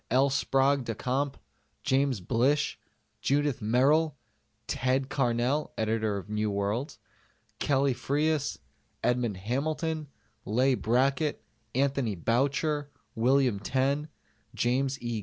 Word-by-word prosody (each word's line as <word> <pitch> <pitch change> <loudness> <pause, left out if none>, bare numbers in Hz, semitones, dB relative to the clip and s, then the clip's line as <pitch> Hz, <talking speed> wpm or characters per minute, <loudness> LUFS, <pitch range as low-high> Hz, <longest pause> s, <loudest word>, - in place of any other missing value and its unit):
L. 135 +3 +3
Sprague 135 0 +2
de 115 -2 -4
Camp, 135 +5 -1 0.5
James 130 -5 +1
Blish, 130 +10 +1 0.4
Judith 145 -1 +1
Merril, 140 +8 +3 0.5
"Ted" 130 +1 0
Carnell 125 +3 0
(Editor 110 -1 0
of 100 - -7
New 105 0 -1
Worlds), 100 +7 -2 0.6
Kelly 140 -1 +2
Freas, 145 +4 0 0.5
Edmond 120 -5 +1
Hamilton, 155 - -2 0.4
Leigh 125 +6 +2
Brackett, 130 +5 +1 0.3
Anthony 135 -5 +1
Boucher, 140 - 0 0.2
William 125 -2 +2
Tenn, 135 +7 0 0.5
James 130 +3 0
E. 120 -2 -2
130 Hz, 100 wpm, -29 LUFS, 115-140 Hz, 0.6 s, L